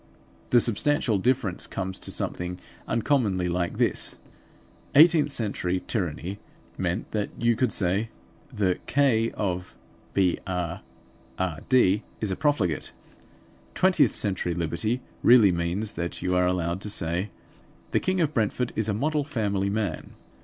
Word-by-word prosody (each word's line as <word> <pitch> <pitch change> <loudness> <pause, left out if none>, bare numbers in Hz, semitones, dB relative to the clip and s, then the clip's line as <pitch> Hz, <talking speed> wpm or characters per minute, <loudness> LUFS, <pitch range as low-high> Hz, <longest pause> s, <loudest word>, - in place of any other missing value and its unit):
The 120 - +6
substantial 115 -1 +1
difference 120 -4 0
comes 95 -1 -4
to - - -7
something 90 0 -4 0.3
uncommonly 110 -7 +1
like 85 0 -1
this: - - 0 0.8
Eighteenth 155 -1 +6
century 95 -6 -1
tyranny 95 -1 -3 0.4
meant 90 +3 -2
that 105 -2 -1
you 120 0 +2
could 125 0 +1
say 100 +4 0 0.4
"The 95 -3 0
K__ 120 -5 +2
of 90 -3 -3 0.4
Br__rd 90 -2 0 1.4
is 105 -3 -2
a - - 0
profligate." 120 - 0 0.8
Twentieth 175 -9 +3
century 95 -4 -1
liberty 90 +9 -1 0.2
really 115 -5 +7
means 85 +5 -1
that 85 +1 -4
you 90 0 +1
are 90 0 +3
allowed 90 0 -1
to 105 - -2
say 85 +1 -1 0.6
"The - - +3
King 185 -1 0
of 155 -2 +1
Brentford 115 +2 0
is 110 0 0
a 105 - 0
model 150 +5 0
family 105 -9 -1
man." 100 -5 -3
100 Hz, 130 wpm, -26 LUFS, 90-120 Hz, 1.4 s, really